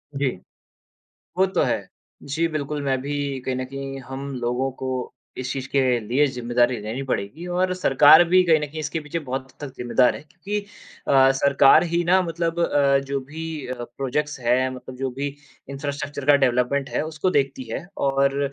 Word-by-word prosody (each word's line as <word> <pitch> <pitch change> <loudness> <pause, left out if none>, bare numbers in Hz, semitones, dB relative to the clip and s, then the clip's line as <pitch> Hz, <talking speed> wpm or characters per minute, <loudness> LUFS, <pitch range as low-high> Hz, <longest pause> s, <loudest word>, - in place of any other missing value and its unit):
जी। 140 0 +1 1.1
वो 190 - +5
तो 190 - 0
है। - - -1 0.4
जी, 160 +4 -1
बिल्कुल 150 -2 -3
मैं 135 -1 +1
भी 140 -1 -3
कहीं 130 0 -2
न 130 0 -3
कहीं 135 0 -6
हम 135 +1 -7
लोगों 125 +2 -1
को 130 - -2 0.5
इस 130 0 -3
चीज़ 135 -1 -5
के 140 - +2 0.2
लिए 120 +7 +2
ज़िम्मेदारी 120 -1 +1
लेनी 115 +6 -4
पड़ेगी 125 - -3
और 180 +1 0
सरकार 155 -2 +7
भी 185 +1 +6
कहीं 160 -3 +4
न 150 - -2
कहीं 155 +2 -8
इसके 155 +1 -3
पीछे 150 +2 -4
बहुत 135 -3 -4
हद 130 - -21
तक 140 -3 -6
ज़िम्मेदार 125 +1 +2
है। - - -8
क्योंकि 180 +6 -5 0.5
अ, 135 -1 +6
सरकार 135 +2 +5
ही 170 0 0
ना 185 +2 +4
मतलब 170 -1 -2
अ, 140 -4 +3
जो 140 0 -1
भी 155 +2 -6
अ, 125 -1 -5
प्रोजेक्ट्स 135 +4 -3
हैं 125 +2 +2
मतलब 130 0 -10
जो 135 0 -2
भी 140 +3 -3 0.4
इंफ्रास्ट्रक्चर 140 0 -5
का 145 0 +6
डेवलपमेंट 135 +1 +1
है - - -1
उसको 155 +3 -1
देखती 135 -1 -1
है। 140 - -4
और 140 0 +1
140 Hz, 185 wpm, -23 LUFS, 130-155 Hz, 1.1 s, सरकार